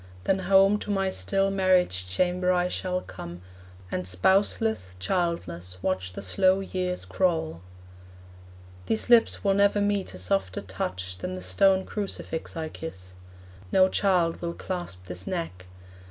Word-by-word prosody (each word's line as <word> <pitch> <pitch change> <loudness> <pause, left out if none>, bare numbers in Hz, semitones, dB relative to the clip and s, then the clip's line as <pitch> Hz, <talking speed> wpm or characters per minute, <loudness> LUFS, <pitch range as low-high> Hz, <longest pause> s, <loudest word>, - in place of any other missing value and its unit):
Then 195 - +2
home 195 +2 +5
To - - -7
my 195 -2 +1
still 195 +1 +1
marriage 185 - +2
chamber 180 - +1
I 180 0 +2
shall 180 0 -2
come, 85 - -9 0.5
And 90 0 -2
spouseless, 190 - +1
childless, 90 - -2
watch 90 -1 -1
the 100 - -6
slow 185 - +3
years 185 -1 -3
crawl. 160 - 0 1.3
These 220 +2 0
lips 235 -1 +5
will 200 -1 +3
never 200 +1 +3
meet 205 - 0
a - - -7
softer 95 +1 -1
touch 95 -1 -5
Than 90 - -4
the 90 - -5
stone 190 - +3
crucifix 195 -6 -4
I 160 -1 -2
kiss; 95 - -9 0.6
no 185 0 +5
child 180 -5 +2
Will 170 -1 -2
clasp 175 - -5
this 90 0 -7
neck. 95 - -4
180 Hz, 140 wpm, -27 LUFS, -, 1.3 s, home